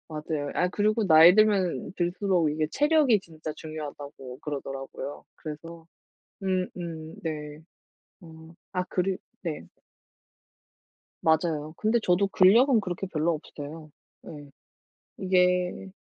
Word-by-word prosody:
맞아요. 150 Hz, -2 st, -4 dB
아 180 Hz, -, +2 dB
그리고 215 Hz, +4 st, +1 dB
나이 165 Hz, +1 st, +8 dB
들면 195 Hz, -, +2 dB
들수록 175 Hz, -2 st, +1 dB
이게 155 Hz, 0 st, -1 dB
체력이 295 Hz, -6 st, +4 dB
진짜 160 Hz, -3 st, -8 dB
중요하다고 145 Hz, -4 st, -8 dB
그러더라고요. 135 Hz, -1 st, -6 dB
그래서 165 Hz, +2 st, -9 dB, 0.6 s
음음 175 Hz, -4 st, -3 dB
네. 150 Hz, -2 st, -5 dB, 0.6 s
어 160 Hz, -1 st, -13 dB, 0.2 s
아 180 Hz, -1 st, -1 dB
그리 185 Hz, +1 st, -1 dB, 0.2 s
네. 155 Hz, -, -5 dB, 1.5 s
맞아요. 160 Hz, -1 st, +1 dB
근데 220 Hz, +2 st, +2 dB
저도 180 Hz, +3 st, +3 dB
근력은 225 Hz, +6 st, +5 dB
그렇게 190 Hz, 0 st, -4 dB
별로 165 Hz, -1 st, 0 dB
없어요. 155 Hz, 0 st, -8 dB, 0.3 s
네. 145 Hz, -2 st, -10 dB, 0.7 s
이게 180 Hz, 0 st, +1 dB
165 Hz, 240 characters per minute, -27 LUFS, 155-185 Hz, 1.5 s, 나이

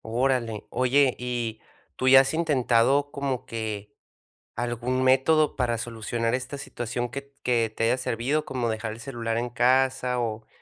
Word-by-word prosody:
Órale. 120 Hz, -2 st, 0 dB
Oye, 130 Hz, +1 st, +3 dB
¿y 120 Hz, -3 st, -3 dB, 0.4 s
tú 130 Hz, -, -1 dB
ya 135 Hz, +1 st, +9 dB
has 135 Hz, -, -2 dB
intentado 140 Hz, -3 st, +2 dB
como 135 Hz, -3 st, -3 dB
que 105 Hz, -3 st, -5 dB, 0.6 s
algún 120 Hz, +2 st, -2 dB
método 135 Hz, +4 st, +3 dB
para 120 Hz, -3 st, 0 dB
solucionar 115 Hz, +1 st, -2 dB
esta 130 Hz, +2 st, -4 dB
situación 120 Hz, -3 st, -4 dB
que 140 Hz, +3 st, -6 dB
t 140 Hz, 0 st, -28 dB
que 115 Hz, -3 st, +1 dB
te -, -, 0 dB
haya 115 Hz, -, +3 dB
servido, 130 Hz, +4 st, -1 dB
como 125 Hz, -4 st, -2 dB
dejar 110 Hz, 0 st, -3 dB
el 110 Hz, -, -9 dB
celular 115 Hz, -3 st, -3 dB
en 120 Hz, +1 st, -2 dB
casa 125 Hz, +1 st, +2 dB
o 110 Hz, -2 st, -3 dB
125 Hz, 160 wpm, -26 LUFS, 115-135 Hz, 0.6 s, ya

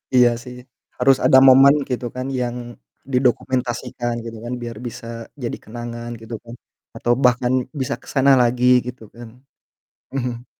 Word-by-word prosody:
Iya 125 Hz, -1 st, +6 dB
sih, 125 Hz, 0 st, -10 dB, 0.4 s
harus 135 Hz, +1 st, +5 dB
ada 130 Hz, 0 st, +7 dB
momen 135 Hz, +2 st, +8 dB
gitu 125 Hz, -1 st, -3 dB
kan 130 Hz, +1 st, -4 dB
yang 120 Hz, 0 st, -2 dB, 0.6 s
didokumentasikan 125 Hz, -1 st, -1 dB
gitu 115 Hz, -1 st, -7 dB
kan, 125 Hz, -, -4 dB
biar 115 Hz, -2 st, -6 dB
bisa 115 Hz, -, -9 dB, 0.4 s
jadi 120 Hz, -, -3 dB
kenangan 120 Hz, +1 st, -7 dB
gitu 115 Hz, +1 st, -7 dB
kan 120 Hz, +1 st, -10 dB, 0.4 s
atau 120 Hz, -, -1 dB
bahkan 125 Hz, 0 st, +3 dB, 0.3 s
bisa 130 Hz, -, -1 dB
ke -, -, -19 dB
sana 140 Hz, 0 st, +4 dB
lagi 120 Hz, +1 st, +1 dB, 0.2 s
gitu 125 Hz, -2 st, -8 dB
kan. 120 Hz, -1 st, -10 dB, 0.8 s
Mhm. 125 Hz, -2 st, -3 dB
125 Hz, 145 wpm, -21 LUFS, 120-130 Hz, 0.8 s, momen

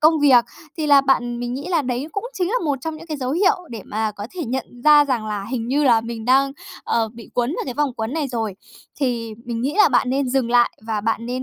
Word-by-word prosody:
công 310 Hz, 0 st, +4 dB
việc, 260 Hz, -5 st, +6 dB, 0.3 s
thì 315 Hz, -2 st, -2 dB
là 285 Hz, -1 st, +7 dB
bạn 245 Hz, -3 st, 0 dB
mình 245 Hz, 0 st, -3 dB
nghĩ 280 Hz, +6 st, -5 dB
là 340 Hz, -4 st, +1 dB
đấy 250 Hz, +2 st, -2 dB
cũng 400 Hz, -, -3 dB
chính 360 Hz, -2 st, 0 dB
là 440 Hz, -, -2 dB
một 285 Hz, -3 st, 0 dB
trong 320 Hz, +3 st, -4 dB
những 330 Hz, +2 st, -12 dB
cái 310 Hz, -, -4 dB
dấu 255 Hz, -2 st, -3 dB
hiệu 375 Hz, +5 st, +3 dB, 0.2 s
để 225 Hz, -4 st, -7 dB
mà 215 Hz, +1 st, -2 dB
có 205 Hz, -, -5 dB
thể 350 Hz, -3 st, -3 dB
nhận 260 Hz, +1 st, -2 dB, 0.2 s
ra 300 Hz, -1 st, +7 dB
rằng 250 Hz, -6 st, -1 dB
là 205 Hz, -2 st, -3 dB
hình 235 Hz, -3 st, -3 dB
như 290 Hz, +3 st, +2 dB
là 235 Hz, -4 st, +5 dB
mình 230 Hz, -1 st, -6 dB
đang, 270 Hz, +3 st, +3 dB, 0.3 s
ờ, 225 Hz, -1 st, +1 dB
bị 230 Hz, -1 st, -12 dB
quấn 245 Hz, +1 st, +1 dB
vào -, -, -3 dB
cái 255 Hz, -, -5 dB
vòng 285 Hz, -2 st, 0 dB
quấn 225 Hz, +1 st, -3 dB
này 310 Hz, -3 st, -1 dB
rồi. 225 Hz, -5 st, -3 dB, 0.5 s
Thì 235 Hz, -4 st, -1 dB
mình 235 Hz, -1 st, -4 dB
nghĩ 275 Hz, +5 st, -1 dB
là -, -, +7 dB
bạn 250 Hz, -, +2 dB
nên 270 Hz, 0 st, 0 dB
dừng 250 Hz, -2 st, 0 dB
lại 240 Hz, 0 st, +4 dB, 0.2 s
và 220 Hz, -2 st, -1 dB
bạn 225 Hz, +2 st, -1 dB
nên 250 Hz, +1 st, -3 dB
255 Hz, 270 wpm, -21 LUFS, 230-290 Hz, 0.5 s, là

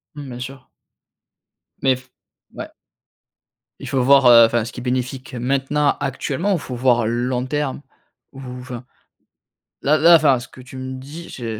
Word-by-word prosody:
Mmh, 145 Hz, -2 st, -8 dB
bien 120 Hz, -1 st, -8 dB
sûr. 130 Hz, +1 st, -9 dB, 1.1 s
Mais 135 Hz, -1 st, +3 dB
f 130 Hz, +1 st, -15 dB, 0.4 s
ouais. -, -, -8 dB, 1.1 s
Il -, -, -8 dB
faut 135 Hz, -, +1 dB
voir, 135 Hz, 0 st, +5 dB
heu, 115 Hz, -1 st, +9 dB
enfin, 115 Hz, -1 st, 0 dB
ce 120 Hz, -, -7 dB
qui 125 Hz, -, -8 dB
est -, -, -9 dB
bénéfique 125 Hz, +1 st, -3 dB
maintenant, 135 Hz, +4 st, 0 dB
actuellement, 140 Hz, +6 st, -2 dB
ou -, -, +2 dB
il -, -, -6 dB
faut 130 Hz, -3 st, -7 dB
voir 120 Hz, -2 st, +2 dB
long 125 Hz, +2 st, -1 dB
terme? 145 Hz, 0 st, -3 dB, 0.5 s
Ou 135 Hz, -, -12 dB, 0.2 s
enfin. 125 Hz, -1 st, -8 dB, 1.0 s
Là 150 Hz, +3 st, +3 dB
là, 170 Hz, +2 st, +7 dB
enfin 145 Hz, -5 st, +4 dB
ce 120 Hz, -, -10 dB
que 130 Hz, -, -14 dB
tu 130 Hz, +1 st, -12 dB
me 130 Hz, 0 st, -6 dB
dis, 150 Hz, +6 st, -10 dB
je 115 Hz, -3 st, -6 dB
130 Hz, 175 wpm, -20 LUFS, 125-140 Hz, 1.1 s, heu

